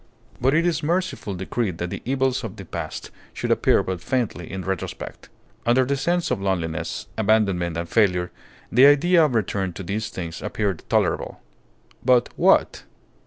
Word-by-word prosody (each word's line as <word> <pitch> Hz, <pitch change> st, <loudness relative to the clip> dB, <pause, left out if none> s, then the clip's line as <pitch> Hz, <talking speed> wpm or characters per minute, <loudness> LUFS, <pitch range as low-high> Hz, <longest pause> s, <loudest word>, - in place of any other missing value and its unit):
But 135 Hz, +4 st, +3 dB
it 165 Hz, +2 st, +3 dB
is 165 Hz, -3 st, +1 dB
mercifully 165 Hz, -, -1 dB
decreed 95 Hz, 0 st, -2 dB
that 85 Hz, 0 st, -4 dB
the -, -, -5 dB
evils 130 Hz, 0 st, 0 dB
of 115 Hz, -, -6 dB
the 100 Hz, -3 st, -9 dB
past -, -, -6 dB, 0.2 s
should -, -, -2 dB
appear -, -, +3 dB
but 95 Hz, -2 st, -4 dB
faintly 115 Hz, -10 st, -2 dB
in 95 Hz, -1 st, -5 dB
retrospect. 95 Hz, -3 st, -5 dB, 0.3 s
Under 125 Hz, +2 st, +3 dB
the 140 Hz, +2 st, 0 dB
sense 170 Hz, +6 st, 0 dB
of -, -, 0 dB
loneliness, 90 Hz, -5 st, -2 dB
abandonment, 100 Hz, -6 st, +2 dB
and 85 Hz, 0 st, -3 dB
failure, 90 Hz, -3 st, +2 dB, 0.4 s
the 130 Hz, +4 st, +7 dB
idea 165 Hz, +4 st, +5 dB
of 145 Hz, -6 st, +1 dB
return 95 Hz, -3 st, -1 dB
to 95 Hz, -, -7 dB
these 105 Hz, +5 st, -3 dB
things 85 Hz, -2 st, -6 dB
appeared 100 Hz, -5 st, -2 dB
tolerable. -, -, 0 dB, 0.6 s
But, 125 Hz, -1 st, +4 dB
what? -, -, +3 dB
110 Hz, 165 wpm, -23 LUFS, 90-135 Hz, 0.6 s, the